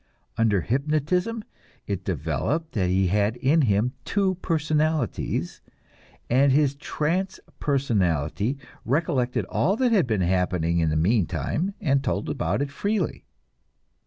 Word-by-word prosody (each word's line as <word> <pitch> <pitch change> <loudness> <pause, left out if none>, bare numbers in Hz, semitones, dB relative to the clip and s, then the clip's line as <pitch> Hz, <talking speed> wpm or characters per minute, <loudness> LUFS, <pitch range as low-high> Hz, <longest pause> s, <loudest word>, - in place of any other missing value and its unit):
Under 110 -4 +2
hypnotism 155 - 0 0.4
it 100 -2 -3
developed 95 - -2
that 95 -4 0
he 95 +1 +2
had 105 +3 +1
in 140 +6 +3
him 115 0 +2
two 195 +2 +1
personalities, 155 - -1 0.7
and 135 +3 +4
his 140 0 +3
trance 160 +6 -2 0.2
personality 105 - 0 0.3
recollected 130 -2 0
all 190 +6 +1
that 250 +1 +1
had 195 - +3
been 110 -5 0
happening 90 -2 +1
in 80 -1 +2
the 75 - 0
meantime 110 - 0
and 140 -7 +1
told - - -1
about 135 0 -1
it 140 - -5
freely. 200 +2 -2
135 Hz, 125 wpm, -25 LUFS, 100-155 Hz, 0.7 s, and